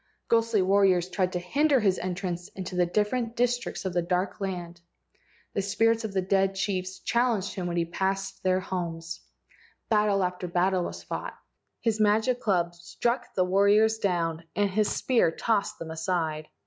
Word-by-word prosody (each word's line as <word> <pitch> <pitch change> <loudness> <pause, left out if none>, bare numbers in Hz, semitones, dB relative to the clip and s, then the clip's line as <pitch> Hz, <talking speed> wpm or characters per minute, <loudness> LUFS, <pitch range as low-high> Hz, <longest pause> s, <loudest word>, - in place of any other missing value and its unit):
Ghostly 230 -3 +3
warriors 190 -2 +3
tried 185 -1 0
to 180 - -1
hinder 275 - +2
his 195 -4 +2
entrance 180 -1 -3
into 185 -1 -5
the 180 -1 +2
different 225 +5 0
districts 245 -3 -1
of 185 - -2
the 175 - +2
dark 180 +4 -1
land. 175 -3 -4 0.7
The 200 - 0
spirits 225 +3 +2
of 195 -4 -2
dead 195 0 +2
chiefs 185 -1 -2
challenged 235 -5 +1
him 185 -3 -3
when 175 0 -2
he 170 - +2
passed 195 +2 -2
their 185 0 +2
homes. 170 -3 -4 0.7
Battle 210 -3 +3
after 180 0 -2
battle 180 +1 +1
was - - -7
fought. - - -5 0.4
His 225 -2 0
magic 220 +4 +3
club 175 -6 +1
struck 235 +8 -3
the 185 - +3
warriors 205 +4 +4
down, 170 -4 -1
and 205 -1 +1
his 210 +2 +2
spear 245 -9 +2
tossed 200 +4 -1
them 165 -1 -7
aside. 160 -2 -2
190 Hz, 160 wpm, -27 LUFS, 180-210 Hz, 0.7 s, warriors